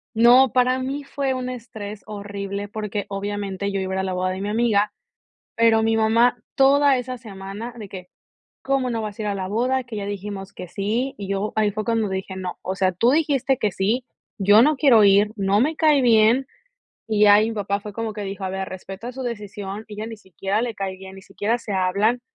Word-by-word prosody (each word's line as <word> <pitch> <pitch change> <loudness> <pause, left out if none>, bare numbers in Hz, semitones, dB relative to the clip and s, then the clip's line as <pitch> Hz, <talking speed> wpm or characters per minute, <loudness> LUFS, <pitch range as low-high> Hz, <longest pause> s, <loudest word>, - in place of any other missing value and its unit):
no, 245 +2 +6
para 255 +1 +2
mí 275 +2 -3
fue 275 -1 -2
un 255 0 -4
estrés 215 -4 -7
horrible 200 -1 -5
porque, 210 -1 -4
obviamente, 200 0 -3
yo 195 - -1
iba 190 0 -3
a - - -1
ir - - -1
a - - 0
la 190 -1 -2
boda 185 0 -1
de 190 +1 -5
mi 205 - -2
amiga, 210 -2 +2 0.6
pero 230 -1 +4
mi 225 0 +2
mamá 230 +3 +3 0.2
toda 275 0 +5
esa 255 0 -4
semana 205 +1 -8
de 210 -3 -8
que: 180 -2 -9 0.5
"¿Cómo 270 -1 0
no 225 -1 -2
vas 210 -1 -6
a - - -3
ir 210 - -2
a 200 - -1
la 190 -1 -4
boda? 255 +5 0
Que 235 -3 -8
ya 200 -1 -4
dijimos 200 -1 -6
que 180 - -9
sí". 220 +8 -2
Y 195 -1 -6
yo, 200 +2 -2
ahí 210 -2 +2
fue 215 0 -3
cuando 225 -3 0
dije: 190 0 -4
"No, 185 -1 -5
o 190 +1 -3
sea, 185 -1 +2
tú 230 +8 +2
dijiste 280 -3 +2
que 205 -3 0
sí, 220 +7 0 0.3
yo 205 +3 +6
no 300 +1 +3
quiero 255 -7 +6
ir, 205 +1 +5
no 200 +1 +2
me 305 +5 +2
cae 305 -3 +4
bien". 235 +2 +4 0.6
Y 215 -1 +1
ya, 205 -1 +8
ahí 215 +2 +4
mi 225 - -5
papá 200 -1 -1
fue 210 0 -8
como 225 0 -3
que 210 -1 -6
dijo: 195 0 -6
"A 190 - -1
ver, 190 0 -4
respeta 195 +6 -8
su 260 +1 -6
decisión, 210 -3 -6
ella 215 0 -6
ni 225 -1 -7
siquiera 195 +2 -3
le 235 -3 -3
cae 190 -1 -4
bien, 190 0 -11
ni 195 - -12
siquiera 225 +4 -2
se 215 -3 -6
hablan, 200 +6 +1
210 Hz, 230 wpm, -23 LUFS, 195-240 Hz, 0.6 s, ya